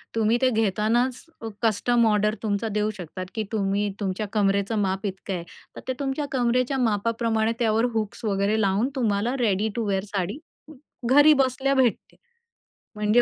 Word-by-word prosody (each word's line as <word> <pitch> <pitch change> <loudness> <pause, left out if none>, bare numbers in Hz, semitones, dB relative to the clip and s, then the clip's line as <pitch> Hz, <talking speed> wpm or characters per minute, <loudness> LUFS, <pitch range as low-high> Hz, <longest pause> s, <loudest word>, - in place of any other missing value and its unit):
तुम्ही 225 +1 +2
ते 260 - +4
घेतानाच 225 +3 +1 0.2
अ, 225 - -5
कस्टम 230 +2 +2
ऑर्डर 210 0 +2
तुमचा 210 +1 -1
देऊ 210 0 +1
शकतात 185 +1 -7
की 220 - -1
तुम्ही 200 -1 0
तुमच्या 200 +1 -2
कमरेचं 200 +1 +1
माप 190 +1 -1
इतकं 190 0 -5
आहे. 170 -2 -3 0.3
तर - - -8
ते 260 - 0
तुमच्या 280 +1 -2
कमरेच्या 255 +1 +1
मापाप्रमाणे 225 0 +1
त्यावर 225 0 +2
हुक्स 215 0 -3
वगैरे 200 +1 +1
लावून 200 +5 +1
तुम्हाला 230 +1 0
रेडी 215 -2 +1
टू 230 -2 -1
वेअर 195 -1 0
साडी 195 +6 -2 0.7
घरी 290 +3 +7
बसल्या 270 0 +1
भेटते. 255 -4 +1 0.8
म्हणजे 210 +3 +3
220 Hz, 155 wpm, -25 LUFS, 200-240 Hz, 0.8 s, घरी